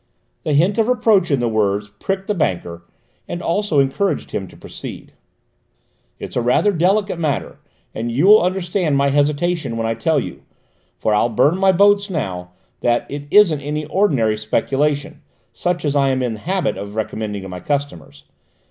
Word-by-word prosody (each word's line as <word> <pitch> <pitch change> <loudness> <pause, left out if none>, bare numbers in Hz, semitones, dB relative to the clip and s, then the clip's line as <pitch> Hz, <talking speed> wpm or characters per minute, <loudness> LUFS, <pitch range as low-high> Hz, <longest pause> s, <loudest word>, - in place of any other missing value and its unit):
The 155 - -1
hint 180 +9 +2
of 225 - +3
reproach 220 -7 +3
in 140 -3 +2
the 120 - 0
words 105 -2 0
pricked 195 0 -2
the 210 - -1
banker, 85 - -2 0.5
and 175 - -4
also 175 -3 0
encouraged 140 +9 0
him 95 - -3
to - - -16
proceed. - - -9 1.0
"It's - - -8
rather 125 - +2
a - - -5
delicate 195 +1 +1
matter, 155 -4 -2 0.3
and 115 +1 -3
you 135 +9 +1
will 210 +2 +8
understand 180 -4 0
my 140 0 +2
hesitation 145 -1 0
when 115 - -1
I 115 - 0
tell 160 +7 +1
you - - -7 0.6
for 110 - 0
I'll 105 +3 +2
burn 145 - +2
my 195 0 +5
boats 200 +2 +3
now 90 - -4 0.3
that 120 0 +1
it 145 0 -6
isn't 170 -6 +5
any 150 +2 -3
ordinary 135 - +1
speculation, 145 +7 -1 0.3
such 175 -2 -2
as 145 -1 0
I 140 -1 +3
am 130 -1 0
in 120 -2 -1
the 110 - -8
habit 185 - -1
of 100 +1 -7
recommending 105 -2 -4
to - - -7
my 90 0 -6
customers. 90 - -4
145 Hz, 175 wpm, -19 LUFS, 115-180 Hz, 1.0 s, will